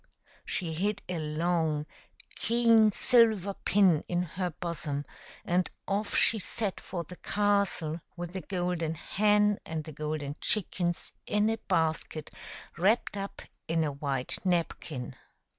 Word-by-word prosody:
She 165 -3 -1
hid 205 +5 -1
a 180 -2 -2
long, 155 -1 0 0.5
keen 230 -1 +5
silver 215 -3 +4
pin 190 -6 +3
in 175 0 0
her 180 +2 -3
bosom, 155 -4 -4 0.4
and 180 +1 +1 0.2
off 205 +1 -1
she 225 - +5
set 200 +1 -2
for 175 -2 -5
the 180 +3 -11
castle 200 -6 0 0.2
with 175 0 -5
the 190 - -3
golden 175 -4 -1
hen 210 +4 +2
and 160 -1 -4
the 155 - -8
golden 150 -1 -3
chickens 175 -4 -1 0.2
in 210 +1 +2
a 225 - -1
basket 160 -3 0 0.5
wrapped 205 +4 +2
up 200 0 -5 0.2
in 165 0 +2
a 150 - 0
white 140 -2 -1
napkin. 165 -7 -1
175 Hz, 130 wpm, -30 LUFS, 160-205 Hz, 0.5 s, keen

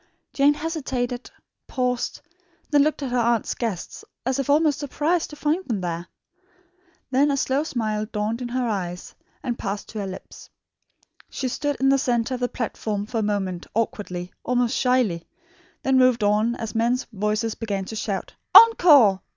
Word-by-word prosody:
Jane 285 +1 +4
hesitated, 265 -6 -3 0.4
paused, 250 -2 -2 0.5
looked 295 0 +3
at 260 - -3
her 250 - +1
aunt's 235 -1 +1
guests 220 -8 -4 0.2
as 260 +1 0
if 275 - -2
almost 300 0 +3
surprised 310 +4 0
to 300 - -9
find 305 +5 0
them 225 -6 -1
there. 175 0 -4 1.0
Then 270 +3 +4
the 280 -1 +1
slow 270 +1 +1
smile 215 -7 -2
dawned 215 +2 -2
in 245 - -3
her 245 0 -1
eyes 180 -5 -4 0.3
and 240 -1 -3
passed 200 +1 -4
to 220 - -6
her 200 - -3
lips. 190 - -10 0.8
She 260 - -3
stood 290 +3 -2
in 270 - +3
the 275 0 +4
centre 245 -1 0
of 250 - -3
the 245 0 0
platform 215 -3 -3
for 225 +1 -3
a - - +1
moment, 195 -4 -2
awkwardly, 185 -5 -3
almost 245 -1 +1
shyly; 240 -10 +1 0.6
then 265 -1 +3
moved 255 -3 +4
on 210 +3 +2
as 225 -3 -5
men's 240 +3 +1
voices 210 +2 -1
began 200 -4 -3
to 220 - -7
shout 200 -3 -3 0.2
"Encore! 290 - +8
240 Hz, 165 wpm, -24 LUFS, 210-270 Hz, 1.0 s, Encore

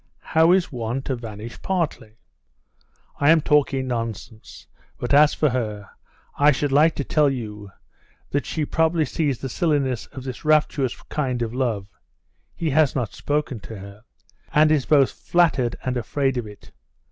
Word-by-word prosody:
"How 160 +2 +5
is 180 -2 +2
one 120 +1 -3
to 135 - -2
vanish 115 -1 -9
partly?" 165 - -2 1.0
"I 145 - +4
am 165 0 +7
talking 145 -3 +2
nonsense. 115 -3 -6 0.3
But 120 - -3
as 150 +1 +6
for 150 - +2
her, 105 -5 -4 0.5
I 145 +1 +6
should 145 0 -1
like 150 +3 +4
to 140 - -2
tell 150 +1 +2
you 105 -6 -6 0.6
that 145 - -1
she 155 -2 -2
probably 160 +1 +1
sees 145 -1 -1
the 135 - -5
silliness 135 -4 0
of 130 - -10
this 130 -2 -7
rapturous 150 -4 +1
kind 130 -5 -2
of 115 0 -4
love 120 -6 -1 0.7
(he 160 -3 -2
has 150 -1 +3
not 120 -6 -2
spoken 145 -4 -2
to 110 +2 -9
her), 100 +2 -12 0.5
and 155 +1 +4
is 150 -4 +1
both 140 -3 +4
flattered 160 -9 +1
and 130 -1 -2
afraid 135 +3 -1
of 120 -3 -3
it. 105 -1 -14
135 Hz, 160 wpm, -23 LUFS, 115-150 Hz, 1.0 s, am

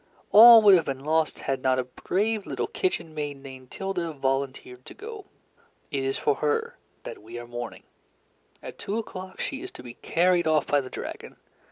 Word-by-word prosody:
All 230 +1 +10
would 205 -2 +8
have 170 -4 +4
been 135 0 -5
lost 160 0 0
had 135 -1 -2
not 130 -1 +2
a 130 - 0
brave 200 - -2
little - - -2
kitchen 265 - -3
maid 145 -2 -4
named 130 -2 -12
Tilda 180 -4 -4
volunteered 135 -2 -3
to - - -10
go. 425 -2 -9 0.6
It 140 -3 -2
is 135 0 -1
for 145 - 0
her 150 -1 -1 0.3
that - - -8
we 115 +3 -10
are 120 - -7
mourning. 120 -1 -7 0.8
At - - -9
two 205 - -3
o'clock 185 -4 -7
she 275 - -4
is 375 - -6
to - - -11
be 120 -1 -9
carried 175 +4 +1
off 155 -1 +2
by 145 -1 +2
the 130 - -9
dragon. - - -8
150 Hz, 190 wpm, -26 LUFS, 135-195 Hz, 0.8 s, All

